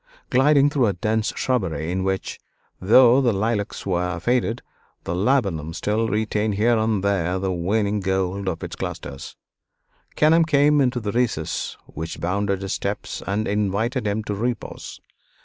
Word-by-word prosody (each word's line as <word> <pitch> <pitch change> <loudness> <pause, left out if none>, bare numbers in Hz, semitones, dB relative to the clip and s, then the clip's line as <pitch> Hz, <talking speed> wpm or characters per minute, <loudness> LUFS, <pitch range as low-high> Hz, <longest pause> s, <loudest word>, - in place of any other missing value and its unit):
Gliding 140 +2 +4
through 135 -5 +2
a 100 - +1
dense 110 +4 -1
shrubbery, 85 - -1
in 95 +1 -1
which, 95 0 -2 0.4
though 120 +6 +6
the 125 -3 +3
lilacs 105 +1 -2
were 90 -1 -1
faded, 120 -1 0 0.4
the 85 - -3
laburnum 95 - 0
still 110 +2 0
retained 105 -1 0
here 115 +4 +3
and 110 -3 0
there 95 -3 0
the 95 0 -1
waning 100 +4 0
gold 95 0 -1
of 85 - -5
its - - -6
clusters, 70 - -6 0.8
Kenelm 160 +2 +4
came 145 0 +4
into 125 -4 0
a - - +1
recess 115 -10 -1
which 80 +2 -7
bounded 100 +2 -1
his 95 - -2
steps - - -4
and 105 +3 -1
invited 105 +4 -1
him 105 +2 -1
to 105 - -3
repose. 120 +4 -4
105 Hz, 150 wpm, -23 LUFS, 95-120 Hz, 0.8 s, though